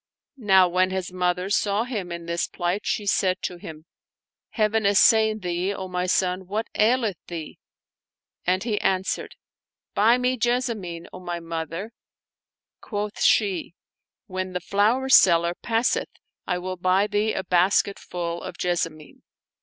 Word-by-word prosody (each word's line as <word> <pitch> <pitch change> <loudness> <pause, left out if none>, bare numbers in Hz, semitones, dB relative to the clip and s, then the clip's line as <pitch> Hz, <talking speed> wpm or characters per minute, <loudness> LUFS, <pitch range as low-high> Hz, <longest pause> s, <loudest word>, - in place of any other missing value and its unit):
Now 190 -5 +5
when 185 +1 +2
his 185 -1 -4
mother 180 +1 -1
saw 205 +1 +1
him 210 -8 -5
in 170 0 -6
this 170 0 -1
plight, 175 +3 -3
she 210 - -1
said 185 -2 +1
to 180 - -3
him, 155 -2 -10 0.4
" - - -69
Heaven 215 0 +1
assain 215 +2 +4
thee, 180 +2 -1
O 190 - -5
my 180 0 -2
son! 185 0 0
What 215 +4 -2
aileth 225 -3 +2
thee?" 165 -3 -7 0.8
And 185 +2 +1
he 220 -3 -1
answered, 190 0 -1 0.6
"Buy 225 +4 +4
me 250 +1 0
Jessamine, 225 -8 -1
,0 185 - -8
my 175 -1 -4
mother! 165 +5 -5 0.5
" - - -68
Quoth 210 -1 -4
she, 190 -5 +2 0.3
" - - -66
When 185 0 -4
the 180 - -1
flower 210 +8 +1
seller 170 -8 +5
passeth 230 +5 0 0.4
I 180 - 0
will 185 +1 -5
buy 185 +3 +2
thee 210 +1 0
a 190 - -3
basketful 180 -2 0
of - - -8
jessamine." 165 -4 -3
185 Hz, 150 wpm, -24 LUFS, 175-210 Hz, 0.8 s, Now